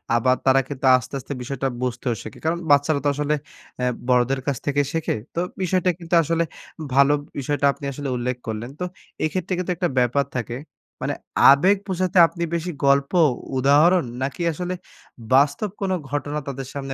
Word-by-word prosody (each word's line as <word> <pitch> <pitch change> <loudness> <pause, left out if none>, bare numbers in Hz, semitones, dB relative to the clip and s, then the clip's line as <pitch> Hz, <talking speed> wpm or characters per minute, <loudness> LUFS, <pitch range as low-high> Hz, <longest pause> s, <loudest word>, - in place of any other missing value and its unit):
আবার 130 +2 +3
তারা 135 0 +5
কিন্তু 135 -2 -5
আস্তে, 125 +2 -9
আস্তে 140 - -6
বিষয়টা 135 +1 -2
বুঝতেও 125 -1 -1
শেখে। 110 - -10
কারণ 170 +2 +1
বাচ্চারা 145 +1 +4
তো - - +4
আসলে 150 +1 0 0.4
অ্যা 125 - +1 0.2
বড়দের 125 +1 +2
কাছ 140 -3 0
থেকে 145 0 +2
শেখে। 165 -1 -1 0.2
তো - - 0 0.2
বিষয়টা 185 0 +1
কিন্তু 170 +1 -8
আসলে 165 +2 +1 0.5
ভালো 140 +2 +5 0.3
বিষয়টা 145 +1 -1
আপনি 140 - -9
আসলে 140 +1 -4
উল্লেখ 125 +1 -2
করলেন। 110 +2 -4
তো - - -2 0.4
এক্ষেত্রে 185 +3 -2
কিন্তু 180 0 -2
একটা 175 0 0
ব্যাপার 125 +3 +2
থাকে। 120 0 -3 0.4
মানে - - -1 0.4
আবেগ 185 +9 +5
বোঝাতে 185 0 -1
আপনি 170 +1 -5
বেশি 170 +1 -2
গল্প, 140 0 +3 0.5
উদাহরণ 150 +7 +5 0.2
নাকি 135 +6 -3
আসলে 180 +3 -3 0.6
বাস্তব 145 +9 +3
কোনো 190 -1 +1
ঘটনা 145 +1 -2
তাদের 135 -1 -5
সামনে 135 -1 -5
140 Hz, 165 wpm, -23 LUFS, 130-170 Hz, 0.6 s, তারা